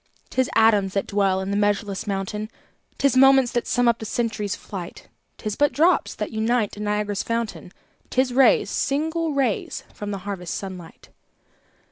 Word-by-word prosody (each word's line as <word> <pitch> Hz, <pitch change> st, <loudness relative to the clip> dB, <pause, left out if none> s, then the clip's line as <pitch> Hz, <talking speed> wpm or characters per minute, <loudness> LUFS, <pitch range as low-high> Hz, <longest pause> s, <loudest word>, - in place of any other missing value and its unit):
'Tis 260 Hz, -1 st, +1 dB
atoms 210 Hz, -4 st, +4 dB
that 195 Hz, -, 0 dB
dwell 195 Hz, -2 st, +1 dB
in 190 Hz, +1 st, -3 dB
the -, -, 0 dB
measureless 205 Hz, -1 st, 0 dB
mountain, 205 Hz, +2 st, -3 dB, 0.5 s
'Tis 275 Hz, -2 st, +2 dB
moments 270 Hz, -1 st, +6 dB
that 240 Hz, -, -1 dB
sum 245 Hz, -1 st, +2 dB
up 235 Hz, -1 st, +3 dB
the -, -, -7 dB
century's 215 Hz, -3 st, -2 dB
flight; 180 Hz, -4 st, -9 dB, 0.3 s
'Tis 215 Hz, -1 st, -4 dB
but 290 Hz, +3 st, +3 dB
drops 335 Hz, +5 st, +2 dB
that -, -, -4 dB
unite 220 Hz, 0 st, 0 dB
in 210 Hz, 0 st, -5 dB
Niagara's 210 Hz, -1 st, -1 dB
fountain, 230 Hz, -5 st, -3 dB, 0.4 s
'Tis 255 Hz, -1 st, +1 dB
rays, 265 Hz, +1 st, +5 dB
single 320 Hz, +3 st, -1 dB
rays, 260 Hz, -7 st, -1 dB
from 205 Hz, -, -6 dB
the 200 Hz, -, -3 dB
harvest 185 Hz, -4 st, -4 dB
sun 190 Hz, -2 st, -5 dB
light. 175 Hz, -2 st, -13 dB
215 Hz, 165 wpm, -23 LUFS, 200-250 Hz, 0.5 s, moments